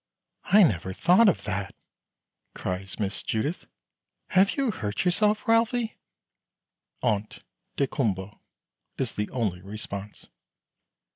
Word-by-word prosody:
"I 210 Hz, +1 st, +7 dB
never 95 Hz, -, +1 dB
thought 185 Hz, -, +5 dB
of 185 Hz, -, -1 dB
that," 100 Hz, -2 st, -3 dB, 0.8 s
cries 95 Hz, +2 st, -4 dB
Miss 100 Hz, -2 st, -2 dB
Judith. 145 Hz, +11 st, -2 dB, 0.6 s
"Have 190 Hz, +5 st, +3 dB
you 270 Hz, -4 st, +1 dB
hurt 105 Hz, -, -3 dB
yourself, 210 Hz, +4 st, +2 dB
Ralphie?" 230 Hz, 0 st, +2 dB, 1.1 s
"Ont 105 Hz, 0 st, -1 dB, 0.3 s
daykumboa," 105 Hz, -8 st, -1 dB, 0.6 s
is -, -, -1 dB
the 105 Hz, 0 st, -2 dB
only 105 Hz, -8 st, -2 dB
response. 100 Hz, 0 st, -7 dB
110 Hz, 100 wpm, -27 LUFS, -, 1.1 s, I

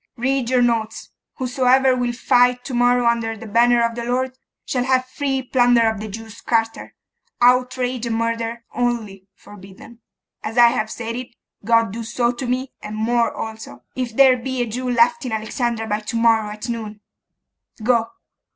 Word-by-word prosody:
'Read 260 Hz, 0 st, 0 dB
your 250 Hz, -1 st, +3 dB
notes. 225 Hz, -2 st, -1 dB, 0.2 s
Whosoever 260 Hz, +1 st, +2 dB
will 245 Hz, -1 st, -1 dB
fight 245 Hz, +1 st, +2 dB
to 265 Hz, -, -6 dB
morrow 245 Hz, 0 st, +3 dB
under 230 Hz, -1 st, 0 dB
the 215 Hz, -, -10 dB
banner 235 Hz, +2 st, +3 dB
of 230 Hz, -, -2 dB
the 235 Hz, 0 st, -5 dB
Lord, 255 Hz, +2 st, -1 dB, 0.3 s
shall 250 Hz, -1 st, -1 dB
have 255 Hz, -1 st, +2 dB
free 270 Hz, 0 st, -2 dB
plunder 245 Hz, -2 st, +3 dB
of 220 Hz, -2 st, -1 dB
the 215 Hz, -, -5 dB
Jews' 220 Hz, +1 st, -9 dB
quarter, 225 Hz, -1 st, -1 dB, 0.4 s
outrage 250 Hz, 0 st, +2 dB
and 225 Hz, -, -1 dB
murder 230 Hz, 0 st, -2 dB
only 220 Hz, -6 st, -2 dB
forbidden. 200 Hz, +4 st, -14 dB, 0.4 s
As 225 Hz, -, -5 dB
I 240 Hz, -1 st, +8 dB
have 220 Hz, -2 st, -2 dB
said 230 Hz, 0 st, -5 dB
it, 250 Hz, -1 st, -8 dB, 0.3 s
God 230 Hz, -1 st, +2 dB
do 230 Hz, +1 st, -5 dB
so 235 Hz, +1 st, 0 dB
to 245 Hz, +1 st, -6 dB
me, 255 Hz, +2 st, -2 dB
and 210 Hz, 0 st, -7 dB
more 230 Hz, +2 st, +1 dB
also, 220 Hz, -, -8 dB
if 245 Hz, -3 st, -4 dB
there 265 Hz, -1 st, +6 dB
be 255 Hz, 0 st, -2 dB
a -, -, -2 dB
Jew 250 Hz, +3 st, -4 dB
left 315 Hz, +6 st, +3 dB
in 250 Hz, -, -4 dB
Alexandria 225 Hz, +1 st, -2 dB
by 210 Hz, 0 st, -1 dB
to 215 Hz, +2 st, -6 dB
morrow 225 Hz, -2 st, +3 dB
at 215 Hz, +2 st, -7 dB
noon. 220 Hz, -3 st, -5 dB, 0.8 s
Go. 230 Hz, -1 st, +2 dB
235 Hz, 175 wpm, -21 LUFS, 225-250 Hz, 0.8 s, I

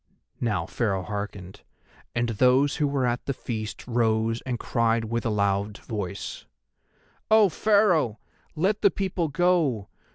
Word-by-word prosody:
Now 115 Hz, -3 st, 0 dB
Pharaoh 100 Hz, -6 st, -1 dB
hearkened, 100 Hz, -2 st, -6 dB, 0.5 s
and 120 Hz, 0 st, +1 dB
those 130 Hz, +5 st, +3 dB
who 150 Hz, -2 st, +2 dB
were 140 Hz, -2 st, 0 dB
at 120 Hz, 0 st, -1 dB
the 140 Hz, -, -1 dB
feast 110 Hz, -4 st, -5 dB
rose 115 Hz, -1 st, +1 dB
and 125 Hz, -2 st, -1 dB
cried 115 Hz, -1 st, +1 dB
with 115 Hz, +1 st, -2 dB
a -, -, +1 dB
loud 100 Hz, 0 st, 0 dB
voice: 100 Hz, -3 st, -6 dB, 0.8 s
"O 215 Hz, -2 st, +6 dB
Pharaoh, 180 Hz, -, +3 dB, 0.4 s
let 195 Hz, +6 st, +1 dB
the 200 Hz, -, +6 dB
people 185 Hz, -4 st, -2 dB
go! 150 Hz, -, +1 dB
120 Hz, 135 wpm, -26 LUFS, 110-155 Hz, 0.8 s, O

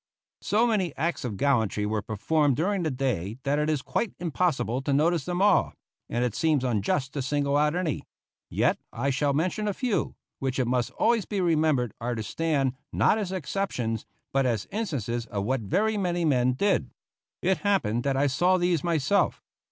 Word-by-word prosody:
So 220 Hz, +4 st, +2 dB
many 200 Hz, -9 st, 0 dB
acts 165 Hz, +1 st, -1 dB
of 110 Hz, -6 st, -4 dB
gallantry 110 Hz, -6 st, +1 dB
were 105 Hz, 0 st, -1 dB
performed 135 Hz, +7 st, +1 dB
during 190 Hz, +6 st, 0 dB
the 160 Hz, -, 0 dB
day 125 Hz, -, -2 dB
that 145 Hz, +1 st, +1 dB
it 150 Hz, +1 st, +1 dB
is 150 Hz, -4 st, 0 dB
quite 230 Hz, -, -2 dB
impossible 145 Hz, -8 st, 0 dB
to 140 Hz, -, -2 dB
notice 155 Hz, +1 st, +2 dB
them 180 Hz, +2 st, 0 dB
all, 205 Hz, -2 st, +4 dB, 0.4 s
and 120 Hz, +1 st, 0 dB
it 120 Hz, -, -1 dB
seems 155 Hz, -1 st, +1 dB
unjust 125 Hz, +3 st, 0 dB
to 140 Hz, -, -2 dB
single 140 Hz, +1 st, 0 dB
out 150 Hz, +2 st, +2 dB
any; 175 Hz, -5 st, -1 dB, 0.5 s
yet -, -, +1 dB
I 140 Hz, +4 st, -1 dB
shall 140 Hz, +2 st, +1 dB
mention 185 Hz, +8 st, 0 dB
a 205 Hz, -, -1 dB
few, 245 Hz, -5 st, -1 dB, 0.2 s
which 130 Hz, -1 st, -2 dB
it 130 Hz, -, +2 dB
must 120 Hz, 0 st, 0 dB
always 230 Hz, -3 st, +2 dB
be 205 Hz, -, -3 dB
remembered 155 Hz, -, +2 dB
are 120 Hz, +1 st, -1 dB
to 110 Hz, -, -3 dB
stand, 140 Hz, +1 st, 0 dB, 0.2 s
not 220 Hz, -, +3 dB
as 195 Hz, -4 st, -3 dB
exceptions, 135 Hz, -, -2 dB, 0.3 s
but 135 Hz, -1 st, +2 dB
as 115 Hz, -4 st, -1 dB
instances 125 Hz, -, -2 dB
of 100 Hz, -3 st, -3 dB
what 130 Hz, +3 st, 0 dB
very 210 Hz, -, +1 dB
many 175 Hz, -3 st, 0 dB
men 130 Hz, -4 st, +3 dB
did. 200 Hz, +10 st, +1 dB, 0.5 s
It 185 Hz, +1 st, +2 dB
happened 190 Hz, -, +1 dB
that 140 Hz, -1 st, 0 dB
I 140 Hz, -, +3 dB
saw 175 Hz, +7 st, +3 dB
these 175 Hz, -4 st, +1 dB
myself. 170 Hz, +3 st, +1 dB
145 Hz, 185 wpm, -27 LUFS, 125-180 Hz, 0.5 s, all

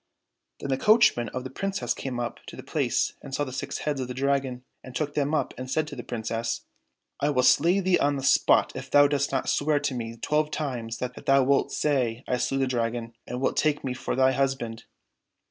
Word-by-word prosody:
Then 140 Hz, -, -5 dB
the 135 Hz, 0 st, 0 dB
coachman 210 Hz, -, +4 dB
of 130 Hz, -, -5 dB
the 130 Hz, -, -7 dB
Princess 195 Hz, +7 st, -2 dB
came 130 Hz, -3 st, -5 dB
up 120 Hz, -1 st, -4 dB
to -, -, -8 dB
the -, -, -9 dB
place -, -, 0 dB
and 135 Hz, -1 st, -6 dB
saw 145 Hz, -, 0 dB
the 130 Hz, -3 st, -6 dB
six -, -, -4 dB
heads 145 Hz, -3 st, -1 dB
of 130 Hz, -, -3 dB
the 125 Hz, -, -6 dB
Dragon, 135 Hz, -2 st, 0 dB, 0.2 s
and 130 Hz, -1 st, -11 dB
took 145 Hz, +2 st, -2 dB
them 145 Hz, +1 st, 0 dB
up -, -, -1 dB
and 130 Hz, 0 st, -6 dB
said 155 Hz, +3 st, 0 dB
to 145 Hz, -, -8 dB
the 125 Hz, -, -5 dB
Princess, 115 Hz, -1 st, -3 dB, 0.3 s
" -, -, -55 dB
I 145 Hz, -, +2 dB
will 130 Hz, -3 st, +2 dB
slay 170 Hz, +10 st, +4 dB
thee 185 Hz, -1 st, +3 dB
on 145 Hz, 0 st, +2 dB
the 135 Hz, -, -4 dB
spot -, -, +4 dB
if -, -, -7 dB
thou 145 Hz, 0 st, +6 dB
dost 140 Hz, -1 st, 0 dB
not 135 Hz, -, -1 dB
swear 150 Hz, 0 st, +2 dB
to 145 Hz, -1 st, -1 dB
me 115 Hz, -2 st, -5 dB
twelve 150 Hz, +5 st, 0 dB
times 125 Hz, -7 st, -4 dB
that 125 Hz, 0 st, -5 dB
thou 135 Hz, 0 st, +5 dB
wilt 140 Hz, +1 st, +2 dB
say 130 Hz, -5 st, 0 dB
I 125 Hz, -, +1 dB
slew 135 Hz, -, -1 dB
the 135 Hz, -, +2 dB
Dragon, 115 Hz, -2 st, -2 dB
and 125 Hz, -, -4 dB
wilt 130 Hz, -, 0 dB
take 150 Hz, -1 st, +1 dB
me 130 Hz, -, -2 dB
for 125 Hz, -, -3 dB
thy 130 Hz, 0 st, +4 dB
husband 130 Hz, -4 st, -2 dB
135 Hz, 230 wpm, -26 LUFS, 125-145 Hz, 0.3 s, thou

